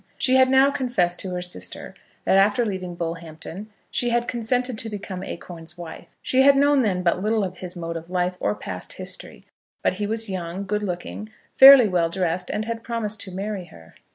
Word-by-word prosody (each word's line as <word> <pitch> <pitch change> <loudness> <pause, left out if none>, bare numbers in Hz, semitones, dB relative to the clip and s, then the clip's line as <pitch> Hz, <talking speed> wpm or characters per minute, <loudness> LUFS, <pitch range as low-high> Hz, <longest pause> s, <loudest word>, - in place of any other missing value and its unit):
She 260 0 +2
had 260 0 +5
now 265 +1 +5
confessed 245 -11 0
to 190 - -3
her 180 0 -3
sister 95 - -5 0.3
that, - - +3
after 205 +4 +3
leaving 185 -4 -4
Bullhampton, 170 +3 -6 0.2
she 240 - 0
had 240 0 0
consented 245 +1 -1
to 225 - -2
become 195 -3 -6
Acorn's 170 -3 -8
wife. 170 -2 -9 0.2
She 260 - +3
had 275 0 +6
known 285 0 +4
then 185 -6 0
but 175 +1 +1
little 215 +1 +1
of 185 -1 -5
his 180 -1 -5
mode 170 -1 -5
of 165 +1 -7
life 180 0 0
or 105 - 0
past - - -6
history; - - -8 0.4
but - - +2
he 205 +2 -3
was 225 +1 -1
young, 185 0 -4
good 210 +2 -1
looking, 200 +2 -5 0.3
fairly 270 -3 +10
well 175 -3 +1
dressed, 180 0 -1
and 215 +1 -2
had 230 0 -4
promised 225 -3 -3
to 190 - -6
marry 195 0 -4
her. 80 - -16
195 Hz, 200 wpm, -23 LUFS, 175-230 Hz, 0.4 s, fairly